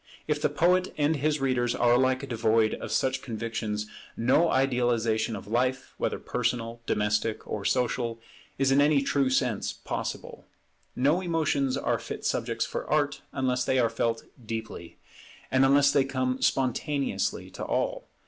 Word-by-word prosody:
If 150 Hz, -1 st, 0 dB
the -, -, +2 dB
poet 180 Hz, +5 st, +2 dB
and 150 Hz, +1 st, +2 dB
his 150 Hz, +2 st, 0 dB
readers 125 Hz, -3 st, +1 dB
are 120 Hz, 0 st, +3 dB
alike 130 Hz, +2 st, +2 dB
devoid 110 Hz, -2 st, +2 dB
of -, -, -6 dB
such 130 Hz, 0 st, +1 dB
convictions, 110 Hz, -3 st, -3 dB, 0.3 s
no 130 Hz, +8 st, +3 dB
idealization 120 Hz, -4 st, +1 dB
of 100 Hz, -, -8 dB
life, 125 Hz, +4 st, -1 dB
whether -, -, -1 dB
personal, 120 Hz, -1 st, -2 dB
domestic, 105 Hz, +1 st, 0 dB
or 105 Hz, -, -4 dB
social, 120 Hz, -2 st, 0 dB, 0.4 s
is 135 Hz, 0 st, +2 dB
in 140 Hz, +1 st, +5 dB
any 145 Hz, -1 st, +4 dB
true 140 Hz, -1 st, +1 dB
sense 125 Hz, -5 st, 0 dB
possible. -, -, -6 dB, 0.5 s
No 145 Hz, +8 st, +2 dB
emotions 155 Hz, -6 st, 0 dB
are -, -, 0 dB
fit -, -, -7 dB
subjects -, -, -1 dB
for -, -, -5 dB
Art 145 Hz, -1 st, +1 dB
unless 125 Hz, -1 st, 0 dB
they 130 Hz, -, +1 dB
are 115 Hz, -3 st, +2 dB
felt 115 Hz, 0 st, -1 dB, 0.2 s
deeply, 110 Hz, -6 st, -6 dB, 0.5 s
and 130 Hz, 0 st, +4 dB
unless 140 Hz, +1 st, +5 dB
they 140 Hz, -, +4 dB
come 130 Hz, -1 st, -2 dB
spontaneously 135 Hz, +2 st, 0 dB
to -, -, -7 dB
all. -, -, -2 dB
130 Hz, 150 wpm, -27 LUFS, 115-140 Hz, 0.5 s, in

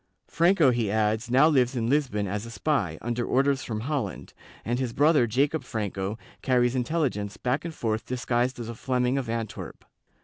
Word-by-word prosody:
Franco, 170 Hz, -4 st, +4 dB
he 120 Hz, -4 st, 0 dB
adds, 110 Hz, +2 st, 0 dB
now 135 Hz, +5 st, +6 dB
lives 130 Hz, -4 st, +2 dB
in 115 Hz, -2 st, -1 dB
Lisbon 130 Hz, -7 st, +1 dB
as 100 Hz, +2 st, -3 dB
a -, -, -8 dB
spy, 105 Hz, -, -1 dB
under 120 Hz, +1 st, -1 dB
orders 135 Hz, +2 st, +1 dB
from 110 Hz, -2 st, -4 dB
Holland, 130 Hz, -6 st, -3 dB, 0.3 s
and 120 Hz, +2 st, -1 dB
his 125 Hz, -3 st, -2 dB
brother 145 Hz, -2 st, +4 dB
Jacob 140 Hz, +7 st, +1 dB
Franco 100 Hz, -2 st, -3 dB, 0.2 s
carries 125 Hz, -2 st, +2 dB
intelligence 125 Hz, -6 st, -1 dB
back 125 Hz, +3 st, -1 dB
and 165 Hz, -2 st, -6 dB
forth 110 Hz, -3 st, -2 dB
disguised 125 Hz, 0 st, -1 dB
as 115 Hz, -, -5 dB
a 115 Hz, -, -5 dB
Fleming 125 Hz, +2 st, 0 dB
of 125 Hz, -4 st, -5 dB
Antwerp. 115 Hz, -3 st, -5 dB
125 Hz, 175 wpm, -26 LUFS, 110-135 Hz, 0.3 s, now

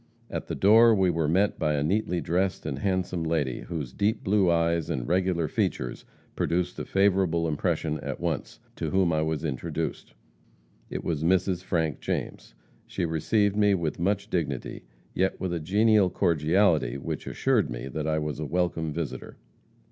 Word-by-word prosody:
At -, -, -4 dB
the -, -, -3 dB
door 110 Hz, +3 st, +6 dB
we 95 Hz, -3 st, +3 dB
were 80 Hz, -2 st, 0 dB
met 95 Hz, +6 st, +2 dB
by 75 Hz, -1 st, +1 dB
a 70 Hz, -, 0 dB
neatly 90 Hz, +1 st, 0 dB
dressed 90 Hz, +3 st, -1 dB
and 70 Hz, -3 st, -3 dB
handsome 95 Hz, -2 st, -1 dB
lady, 80 Hz, -6 st, -1 dB
whose 75 Hz, -8 st, -5 dB
deep 105 Hz, -, 0 dB
blue 95 Hz, -2 st, +3 dB
eyes 85 Hz, -1 st, +1 dB
and -, -, -2 dB
regular 90 Hz, -2 st, +1 dB
features 65 Hz, -3 st, -2 dB, 0.3 s
produced 90 Hz, +1 st, -1 dB
a -, -, -4 dB
favorable 95 Hz, -4 st, +2 dB
impression 80 Hz, 0 st, -1 dB
at -, -, -5 dB
once, -, -, -3 dB, 0.2 s
to -, -, -2 dB
whom 95 Hz, -3 st, +2 dB
I 80 Hz, -, +1 dB
was 80 Hz, 0 st, -2 dB
introduced. 70 Hz, -5 st, -4 dB, 0.7 s
It -, -, -5 dB
was 80 Hz, -2 st, -2 dB
Mrs. 90 Hz, +1 st, +1 dB
Frank 80 Hz, -6 st, -1 dB
James. -, -, -4 dB, 0.3 s
She -, -, -2 dB
received 100 Hz, +6 st, +1 dB
me 105 Hz, -1 st, +4 dB
with 85 Hz, -4 st, -3 dB
much 100 Hz, +3 st, 0 dB
dignity, 70 Hz, -7 st, -3 dB, 0.3 s
yet 95 Hz, +1 st, 0 dB
with 95 Hz, -2 st, -2 dB
a 85 Hz, -, -1 dB
genial 100 Hz, +4 st, +3 dB
cordiality 85 Hz, -4 st, +2 dB
which 70 Hz, -, -5 dB
assured -, -, +1 dB
me -, -, -5 dB
that 75 Hz, +3 st, -4 dB
I 80 Hz, 0 st, +1 dB
was 75 Hz, -1 st, -3 dB
a 75 Hz, -, -3 dB
welcome 85 Hz, -1 st, -1 dB
visitor. 80 Hz, 0 st, -5 dB
85 Hz, 170 wpm, -27 LUFS, 80-95 Hz, 0.7 s, door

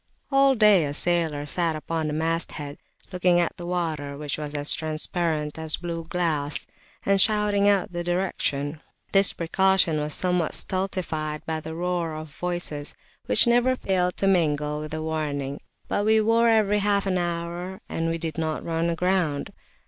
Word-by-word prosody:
All 275 Hz, 0 st, +5 dB
day 210 Hz, -6 st, +6 dB
a 145 Hz, 0 st, -3 dB
sailor 160 Hz, -4 st, +1 dB
sat 165 Hz, +2 st, 0 dB
upon 160 Hz, +1 st, -3 dB
the 150 Hz, -, -2 dB
masthead, 160 Hz, -2 st, -2 dB, 0.3 s
looking 180 Hz, -1 st, +3 dB
at 170 Hz, -, 0 dB
the 175 Hz, -, -7 dB
water, 155 Hz, -5 st, -2 dB
which 145 Hz, -1 st, -3 dB
was 150 Hz, -1 st, -5 dB, 0.2 s
transparent 155 Hz, -1 st, -1 dB
as 160 Hz, -1 st, 0 dB
blue 170 Hz, -1 st, -5 dB
glass, 160 Hz, -5 st, -1 dB, 0.4 s
and 195 Hz, -1 st, +4 dB
shouting 210 Hz, -1 st, +3 dB
out 195 Hz, -3 st, +1 dB
the 175 Hz, 0 st, -3 dB
direction. 160 Hz, -5 st, -1 dB, 0.3 s
This 195 Hz, -1 st, +4 dB
precaution 175 Hz, -1 st, +2 dB
was 150 Hz, 0 st, -1 dB
somewhat 180 Hz, -3 st, +1 dB
stultified 175 Hz, -6 st, -2 dB
by 160 Hz, -1 st, -2 dB
the 160 Hz, +1 st, -7 dB
roar 175 Hz, -2 st, -2 dB
of 155 Hz, 0 st, -7 dB
voices, 175 Hz, -5 st, -3 dB, 0.3 s
which -, -, +4 dB
never 245 Hz, +2 st, +3 dB
[p.218] -, -, -17 dB
failed 180 Hz, -2 st, +1 dB
to 195 Hz, -, +1 dB
mingle 150 Hz, -5 st, +1 dB
with 155 Hz, -, -6 dB
the 155 Hz, 0 st, -4 dB
warning, 145 Hz, -3 st, -3 dB, 0.3 s
but 205 Hz, -, 0 dB
we 220 Hz, +1 st, +4 dB
wore 230 Hz, +2 st, +3 dB
every 210 Hz, -2 st, +3 dB
half 200 Hz, -1 st, +1 dB
hour, 175 Hz, 0 st, -2 dB
and 165 Hz, 0 st, -2 dB
we 165 Hz, -, -1 dB
did 165 Hz, -1 st, -4 dB
not 160 Hz, -1 st, -2 dB
run 165 Hz, 0 st, 0 dB
aground. 170 Hz, -3 st, 0 dB
170 Hz, 165 wpm, -25 LUFS, 155-190 Hz, 0.4 s, day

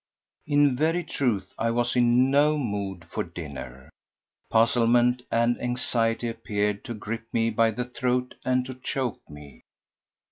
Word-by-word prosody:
In 145 Hz, -2 st, +4 dB
very 165 Hz, +6 st, +1 dB
truth 115 Hz, -, -1 dB
I 115 Hz, -, +1 dB
was 120 Hz, +1 st, 0 dB
in 125 Hz, +2 st, +4 dB
no 150 Hz, +2 st, +4 dB
mood 100 Hz, -8 st, -3 dB
for 85 Hz, -, -3 dB
dinner. 70 Hz, -7 st, -9 dB, 0.6 s
Puzzlement 120 Hz, +1 st, +3 dB
and 120 Hz, +1 st, +1 dB
anxiety 120 Hz, -1 st, 0 dB
appeared 105 Hz, -2 st, -2 dB
to 120 Hz, -, -5 dB
grip 110 Hz, +2 st, -5 dB
me 115 Hz, 0 st, +1 dB
by 115 Hz, +1 st, +3 dB
the 125 Hz, +3 st, -3 dB
throat 125 Hz, 0 st, -1 dB
and 125 Hz, 0 st, +1 dB
to 130 Hz, -, -6 dB
choke 130 Hz, -1 st, -3 dB
me. 75 Hz, -2 st, -13 dB
120 Hz, 140 wpm, -26 LUFS, 105-125 Hz, 0.6 s, In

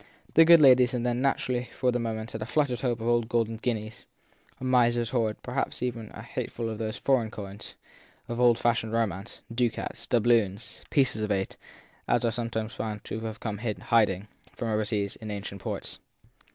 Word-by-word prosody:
The 165 Hz, -, +8 dB
good 170 Hz, 0 st, +9 dB
ladies 130 Hz, -3 st, +6 dB
had 120 Hz, -2 st, -1 dB
naturally 125 Hz, 0 st, +1 dB
had 125 Hz, -, -12 dB
for 125 Hz, -1 st, +2 dB
the 120 Hz, -, 0 dB
moment 110 Hz, -1 st, -4 dB
a 110 Hz, -1 st, -3 dB
fluttered 140 Hz, -3 st, +1 dB
hope 120 Hz, -3 st, -1 dB
of 115 Hz, -, -3 dB
old 120 Hz, -1 st, +2 dB
golden 115 Hz, -1 st, 0 dB
guineas 110 Hz, -2 st, -3 dB, 0.5 s
a -, -, -9 dB
miser 120 Hz, -2 st, +3 dB
s 115 Hz, -, -3 dB
hoard; 115 Hz, -4 st, 0 dB
perhaps 125 Hz, 0 st, -2 dB
even 115 Hz, -3 st, -3 dB
of -, -, -12 dB
a -, -, -7 dB
hat -, -, -4 dB
ful 115 Hz, -1 st, -4 dB
of 110 Hz, -1 st, -5 dB
those 110 Hz, +1 st, -3 dB
foreign 125 Hz, -5 st, +2 dB
coins 100 Hz, -2 st, -8 dB, 0.5 s
of 120 Hz, 0 st, -4 dB
old 120 Hz, -2 st, +5 dB
fashioned 115 Hz, -2 st, 0 dB
romance, 105 Hz, -4 st, -2 dB
ducats, 115 Hz, -1 st, -2 dB
doubloons, 115 Hz, -3 st, +1 dB
pieces 130 Hz, -6 st, +2 dB
of 105 Hz, 0 st, -1 dB
eight, 95 Hz, -1 st, -1 dB, 0.5 s
as -, -, +2 dB
are 115 Hz, -, +2 dB
sometimes 115 Hz, -1 st, -3 dB
found 105 Hz, -2 st, -4 dB
to 110 Hz, -, -4 dB
have 110 Hz, -1 st, -5 dB
come 105 Hz, -3 st, -4 dB
to 110 Hz, -1 st, -1 dB
hiding, 105 Hz, -4 st, +2 dB, 0.3 s
from 115 Hz, -, -3 dB
over 110 Hz, 0 st, +1 dB
seas, 100 Hz, -2 st, -2 dB
in 110 Hz, -, -8 dB
ancient 100 Hz, -1 st, -6 dB
ports. -, -, -5 dB
115 Hz, 195 wpm, -28 LUFS, 110-120 Hz, 0.5 s, good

